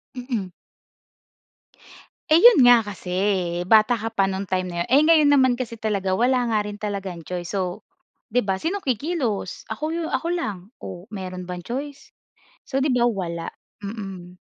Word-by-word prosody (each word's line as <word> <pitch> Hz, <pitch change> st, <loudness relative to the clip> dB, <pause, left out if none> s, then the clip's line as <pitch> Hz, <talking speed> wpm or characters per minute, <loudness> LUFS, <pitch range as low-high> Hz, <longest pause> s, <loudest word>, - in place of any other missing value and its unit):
Mm. 240 Hz, -7 st, -4 dB, 1.8 s
Eh, 310 Hz, -, +7 dB
'yon 460 Hz, -, +8 dB
nga 245 Hz, -3 st, +7 dB
kasi, 185 Hz, -3 st, -6 dB, 0.5 s
bata 220 Hz, +4 st, +5 dB
ka 225 Hz, +1 st, -3 dB
pa 195 Hz, -2 st, +2 dB
nung 190 Hz, +1 st, -3 dB
time 185 Hz, -1 st, -1 dB
na 175 Hz, -, -7 dB
'yon. -, -, -19 dB
Eh, 275 Hz, +3 st, +6 dB
ngayon 310 Hz, -3 st, +6 dB
naman 260 Hz, -3 st, +5 dB
kasi 230 Hz, -3 st, -5 dB
talaga 200 Hz, -4 st, -1 dB
wala 245 Hz, +4 st, +2 dB
nga 215 Hz, -, +2 dB
rin 205 Hz, 0 st, -6 dB
talagang 195 Hz, -5 st, -5 dB
choice 175 Hz, -1 st, -5 dB
so, 185 Hz, +1 st, -2 dB, 0.5 s
'di 245 Hz, +3 st, +2 dB
ba? 190 Hz, -1 st, -1 dB
Sinong 385 Hz, +4 st, -2 dB
kikilos? 255 Hz, -, -2 dB
Ako 305 Hz, +8 st, -3 dB, 0.2 s
ako 265 Hz, +5 st, -1 dB
lang, 210 Hz, -, -3 dB
o 180 Hz, 0 st, -9 dB
mayro'n 185 Hz, -3 st, -6 dB
bang 180 Hz, -1 st, -5 dB
choice? 280 Hz, +3 st, -6 dB, 0.5 s
So 270 Hz, -, -2 dB
'di 275 Hz, -3 st, +2 dB
ba, 240 Hz, -1 st, +3 dB
wala. 170 Hz, -5 st, -4 dB, 0.3 s
Mm. 195 Hz, -4 st, -7 dB
215 Hz, 160 wpm, -23 LUFS, 185-255 Hz, 1.8 s, yon